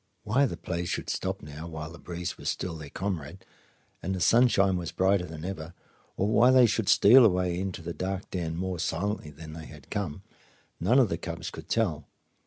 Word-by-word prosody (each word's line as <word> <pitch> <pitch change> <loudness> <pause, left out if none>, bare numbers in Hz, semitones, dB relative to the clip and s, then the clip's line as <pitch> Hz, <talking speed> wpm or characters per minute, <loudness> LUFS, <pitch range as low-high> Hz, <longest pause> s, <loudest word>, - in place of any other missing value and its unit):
Why 135 +7 +3
the - - -6
play 85 0 -3
should - - -2
stop - - -3
now, 75 +3 -8
while 80 -1 -6
the 85 - -12
breeze 90 +1 -5
was - - -4
still 90 -3 -3
their 75 -3 -8
comrade 95 -2 -4 0.6
and 95 +1 -2
the - - -4
sunshine 100 -2 +4
was 85 -2 -3
brighter 95 -1 +2
than 80 0 -8
ever, 85 -3 -6 0.4
or 100 - +1
why 115 +3 +5
they 130 -1 +7
should 110 -2 0
steal 120 +6 +8
away 90 -4 +2
into 95 -3 -4
the 85 +1 -4
dark 95 +2 -4
den 85 -3 -2
more 90 0 -3
silently 90 0 -2
than 80 +1 -10
they 80 0 -8
had 75 -3 -14
come, 95 -4 -3 0.6
none 110 +10 +3
of 125 -6 +5
the 85 - -2
cubs 85 +1 -5
could - - -10
tell. 85 -11 0
90 Hz, 200 wpm, -28 LUFS, 80-100 Hz, 0.6 s, steal